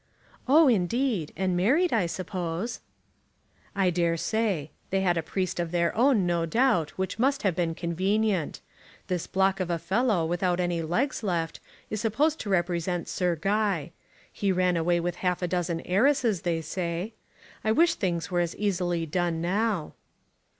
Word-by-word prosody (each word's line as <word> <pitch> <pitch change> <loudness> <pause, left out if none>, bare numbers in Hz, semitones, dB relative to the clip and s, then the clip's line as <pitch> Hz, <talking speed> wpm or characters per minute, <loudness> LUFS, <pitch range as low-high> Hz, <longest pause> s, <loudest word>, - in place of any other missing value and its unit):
"Oh, 300 +4 +6
indeed. 225 - +1
And 185 -1 0
married, 275 - +3
I 210 -7 +2
suppose." 180 +4 -4 1.0
"I 190 -2 +2
dare 170 -1 +1
say. 195 -7 -1 0.2
They 195 0 +1
had 180 -2 +2
a 165 - 0
priest 180 +2 -3
of 170 -1 -1
their 170 0 0
own, 240 -5 +4
no 170 -1 0
doubt, 225 - +2
which 190 +3 -3
must 275 +3 +1
have 190 -5 +1
been 170 -2 -1
convenient. 190 +1 0 0.5
This 180 -3 -2
block 195 0 +1
of 185 -2 -2
a 170 - 0
fellow 195 0 +1
without 175 +1 0
any 175 -2 0
legs 205 - -1
left 170 -6 -2 0.3
is 215 -1 -2
supposed 290 +8 +1
to 210 - -5
represent 175 -1 0
Sir 180 -2 0
Guy. 195 -2 0 0.4
He 200 -1 0
ran 180 -1 +2
away 170 +1 +2
with 175 0 -2
half 180 -1 -1
a - - +1
dozen 175 -1 -1
heiresses, 225 - +2
they 170 -3 -1
say. 170 +5 -3 0.5
I 220 - +2
wish 335 +9 +4
things 170 -3 -2
were 175 - +1
as 175 -1 -1
easily 175 -5 -1
done 170 0 -1
now." 195 0 -1
180 Hz, 165 wpm, -27 LUFS, 170-210 Hz, 1.0 s, Oh